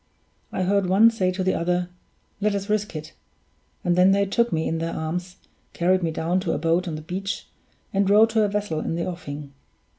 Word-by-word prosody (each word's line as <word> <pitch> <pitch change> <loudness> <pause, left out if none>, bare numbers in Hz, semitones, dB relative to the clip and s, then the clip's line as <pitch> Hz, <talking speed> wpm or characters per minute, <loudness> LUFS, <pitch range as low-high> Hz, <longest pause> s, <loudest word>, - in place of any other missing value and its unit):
I 185 - -1
heard 200 0 +2
one 215 +5 +6
say 190 -5 0
to 185 +1 -2
the 185 - +2
other, 175 +1 0 0.5
'Let 205 0 +1
us 200 +1 -3
risk 210 -4 -1
it'; 155 0 -7 0.7
and 175 -1 +2
then 185 +2 +5
they 200 0 +3
took 235 +4 +1
me 160 -1 0
in 165 - -1
their 165 0 -3
arms, 180 +3 -4 0.4
carried 185 +2 +2
me 165 - 0
down 165 +3 0
to 175 -3 -1
a - - 0
boat 165 +4 +1
on 160 - -3
the 155 - -7
beach, 190 +4 -4 0.5
and 195 0 +2
rowed 215 +2 +6
to 220 0 +3
a 210 - +3
vessel 205 -6 -2
in 165 - -2
the 170 - -2
offing. 145 -5 -6
185 Hz, 215 wpm, -24 LUFS, 165-200 Hz, 0.7 s, one